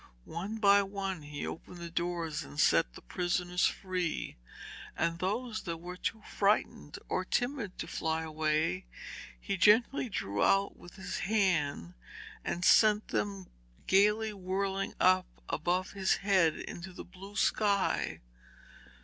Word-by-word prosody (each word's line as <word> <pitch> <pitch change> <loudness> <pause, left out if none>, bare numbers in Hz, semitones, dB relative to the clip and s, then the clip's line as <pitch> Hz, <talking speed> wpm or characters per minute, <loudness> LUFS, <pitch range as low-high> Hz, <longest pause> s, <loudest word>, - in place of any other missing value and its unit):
One 195 +7 -5
by 200 -2 +6
one 195 -3 -4
he 145 0 -6
opened 175 +2 -7
the 170 -1 -7
doors 170 -2 -2
and 70 +1 -9
set - - +3
the - - -11
prisoners 180 - 0
free, 180 -4 -3 0.6
and 170 0 0
those 220 +5 -2
that 170 -2 -3
were 175 +2 -8
too 215 +4 -3
frightened 205 +1 0
or - - -1
timid 245 -6 -2
to - - -4
fly 160 0 -1
away, 160 +3 0 0.5
he 195 -2 -3
gently 225 +6 +4
drew 100 - -2
out 195 0 +3
with 175 - -14
his 195 -1 -5
hand, 175 - +1 0.5
and 175 +1 -2
sent 215 -1 +5
them 100 - -2 0.3
gaily 210 +3 +3
whirling 195 0 -2
up 185 0 +4 0.2
above 180 +3 -1
his 190 -1 +1
head 185 -6 +4
into 175 +2 -7
the - - -8
blue 195 +3 -12
sky. 205 -2 +1
185 Hz, 135 wpm, -31 LUFS, 165-200 Hz, 0.6 s, by